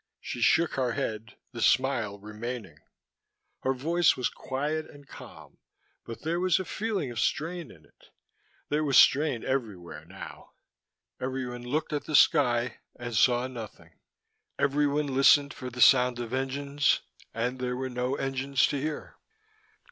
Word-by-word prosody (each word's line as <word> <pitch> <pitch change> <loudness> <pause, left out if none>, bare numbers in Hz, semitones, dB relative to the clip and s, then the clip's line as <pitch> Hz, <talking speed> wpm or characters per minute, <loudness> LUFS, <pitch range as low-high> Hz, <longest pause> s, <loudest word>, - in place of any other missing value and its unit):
She - - -6
shook 170 0 +4
her 125 -3 0
head, 110 +1 -4 0.2
the 120 -2 -7
smile 120 -7 +2
remaining. 110 +3 -7 0.8
Her 130 - 0
voice 165 +6 +2
was 125 - 0
quiet 150 +4 -3
and 145 -1 -15
calm, - - -13 0.5
but 115 - -9
there 165 +2 -1
was 185 +1 +2
a 190 - -4
feeling 200 - -3
of 120 - -5
strain 170 +1 -1
in 80 -3 -17
it: - - -25 0.6
there 150 +1 +1
was 140 -3 +3
strain 140 -4 +4
everywhere, 110 -10 -4
now. - - -11 0.7
Everyone 130 -2 -4
looked 145 +6 -2
at 145 - -2
the 155 - -2
sky, 125 -5 +3 0.2
and 120 -1 -6
saw 120 +3 +3
nothing: 120 -5 -10 0.6
everyone 145 +1 +1
listened 140 +1 +4
for 125 - -7
the 125 0 -6
sound 125 -2 +6
of 120 0 -5
engines, 140 +2 0 0.3
and 120 +3 -2
there 125 -1 -2
were 130 0 -3
no 125 +1 -2
engines 135 0 0
to 145 -2 -2
hear. 155 +1 -5
130 Hz, 150 wpm, -28 LUFS, 120-145 Hz, 0.8 s, sound